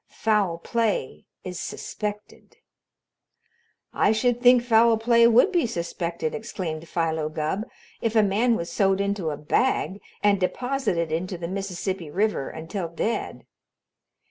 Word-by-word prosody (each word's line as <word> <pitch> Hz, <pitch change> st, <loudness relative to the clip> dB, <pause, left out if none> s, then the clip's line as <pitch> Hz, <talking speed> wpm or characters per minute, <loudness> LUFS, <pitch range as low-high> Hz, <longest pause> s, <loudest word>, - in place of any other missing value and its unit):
Foul 210 Hz, -6 st, 0 dB
play 215 Hz, -, -2 dB, 0.2 s
is 180 Hz, -2 st, -6 dB
suspected. 210 Hz, 0 st, -6 dB, 1.4 s
"I -, -, +3 dB
should 240 Hz, +2 st, +1 dB
think 245 Hz, -1 st, +6 dB
foul 230 Hz, -1 st, +5 dB
play 235 Hz, +1 st, +5 dB
would 240 Hz, -, +5 dB
be 345 Hz, -9 st, +2 dB
suspected," 170 Hz, -4 st, -3 dB
exclaimed 170 Hz, -8 st, -5 dB
Philo 160 Hz, -2 st, -1 dB
Gubb, 155 Hz, +9 st, -2 dB, 0.3 s
"if 230 Hz, -1 st, -1 dB
a 220 Hz, -, +6 dB
man 220 Hz, +4 st, +2 dB
was 170 Hz, -4 st, -4 dB
sewed 195 Hz, -1 st, +2 dB
into 200 Hz, -4 st, -1 dB
a 145 Hz, -, -4 dB
bag 200 Hz, -, 0 dB, 0.2 s
and 205 Hz, -1 st, +4 dB
deposited 200 Hz, -, -1 dB
into 180 Hz, +3 st, -2 dB
the 170 Hz, 0 st, -5 dB
Mississippi 190 Hz, -2 st, -4 dB
River 200 Hz, -4 st, 0 dB
until 165 Hz, +3 st, -5 dB
dead." 170 Hz, +7 st, -3 dB
200 Hz, 130 wpm, -25 LUFS, 170-230 Hz, 1.4 s, think